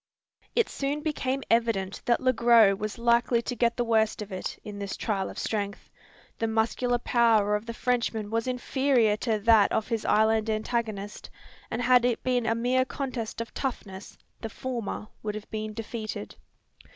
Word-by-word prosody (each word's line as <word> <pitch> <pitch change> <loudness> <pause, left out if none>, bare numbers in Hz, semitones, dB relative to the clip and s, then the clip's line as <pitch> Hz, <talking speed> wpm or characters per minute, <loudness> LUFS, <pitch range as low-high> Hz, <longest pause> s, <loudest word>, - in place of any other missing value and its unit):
It 465 - +3
soon 285 +2 -3
became 275 -3 -2
evident 225 -5 +1
that 235 - +3
Le 255 0 +3
Gros 230 -4 +5
was 215 +3 -5
likely 235 0 +3
to 245 - -3
get 235 +1 +1
the 245 - +1
worst 220 -2 +1
of 205 - -13
it, 185 - -4
in 210 -2 -7
this 200 -1 -4
trial 195 -4 -1
of - - -10
strength. 200 -2 -3 0.5
The 225 - 0
muscular 225 +2 +1
power 225 -4 +3
of 210 +2 -4
the 230 - -4
Frenchman 235 -4 -1
was 230 +2 -1
inferior 250 -3 +2
to 220 0 0
that 215 -1 +5
of 220 - -1
his 225 -2 -1
island 220 +1 +3
antagonist; 215 -2 -3 0.4
and 240 +2 -2
had 250 0 +5
it 245 -2 0
been 250 -2 +1
a 225 - +2
mere 250 +2 +2
contest 255 -4 -4
of 230 - -7
toughness, 205 -7 -5 0.2
the 225 - -5
former 235 -3 -5
would 210 -1 -3
have 215 0 -8
been 215 0 -3
defeated. 220 0 -6
230 Hz, 175 wpm, -27 LUFS, 215-245 Hz, 0.5 s, Gros